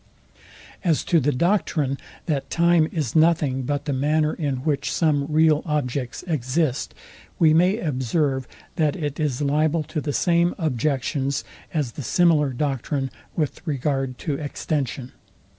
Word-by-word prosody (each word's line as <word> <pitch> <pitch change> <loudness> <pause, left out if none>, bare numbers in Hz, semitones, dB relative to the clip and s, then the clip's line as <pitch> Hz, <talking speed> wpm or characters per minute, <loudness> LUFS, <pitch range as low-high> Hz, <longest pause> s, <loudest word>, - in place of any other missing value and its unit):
As 165 -5 +2
to 170 - +3
the 145 +1 +1
doctrine, 150 -3 +1 0.3
that 145 -5 -2
time 170 -2 +3
is 150 -9 -2
nothing 155 -5 +3
but 145 +2 -2
the 145 - -1
manner, 150 +3 +1
in 145 -5 -2
which 145 -3 0
some 145 -4 +1
real 155 0 +4
objects 140 -5 -2
exist; 150 -3 -1 0.4
we 160 -2 +5
may 180 +6 +4
observe, 135 - -1 0.3
that 155 -1 +2
it 150 -5 -4
is 145 -3 0
liable 155 +3 +2
to 150 +1 -4
the 145 - -2
same 170 +3 +2
objections 140 - -1 0.3
as 145 -7 -1
the 145 - -7
similar 155 -1 +3
doctrine 135 0 -2 0.2
with 150 -4 -2
regard 135 -3 -1
to 155 - -3
extension. 140 -3 -3
150 Hz, 140 wpm, -23 LUFS, 135-160 Hz, 0.4 s, we